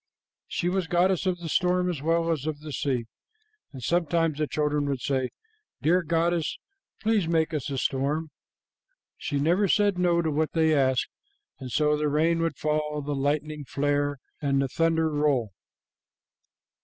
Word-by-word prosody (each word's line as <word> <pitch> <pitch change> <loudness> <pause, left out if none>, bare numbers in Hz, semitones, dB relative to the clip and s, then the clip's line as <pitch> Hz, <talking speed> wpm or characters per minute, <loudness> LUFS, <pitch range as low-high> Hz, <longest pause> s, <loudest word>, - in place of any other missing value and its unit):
She 175 - -2
was 185 -1 0
goddess 180 +2 +2
of 180 -1 +1
the 170 -1 -7
storm 180 +2 +2
as 170 -6 -2
well 165 +2 +1
as 155 -2 -2
of 150 -2 -3
the 155 0 -7
sea, 130 -5 -1 0.7
and 130 -4 -9
sometimes 165 -1 +1
the 150 - +1
children 150 -1 0
would 135 -2 -1
say, 130 -1 0 0.5
'Dear 175 +5 +4
goddess, 170 0 0 0.5
please 215 -5 +2
make 165 -1 +1
us 145 -4 -2
a 135 - -3
storm.' 145 +5 -1 0.8
She 145 - -3
never 175 +8 +3
said 205 -1 +2
no 170 -1 +3
to 160 - 0
what 155 +1 0
they 160 -1 +3
asked, 130 -3 +2 0.5
and 130 -2 -7
so 150 +2 +2
the 150 0 0
rain 165 +3 +2
would 165 -4 -1
fall, 150 -1 -1
the 145 +1 -2
lightning 145 +2 -1
flare, 145 +1 0 0.2
and 140 -2 +1
the 135 - +1
thunder 165 +2 +2
roll. 145 -8 +1
155 Hz, 165 wpm, -26 LUFS, 145-170 Hz, 0.8 s, Dear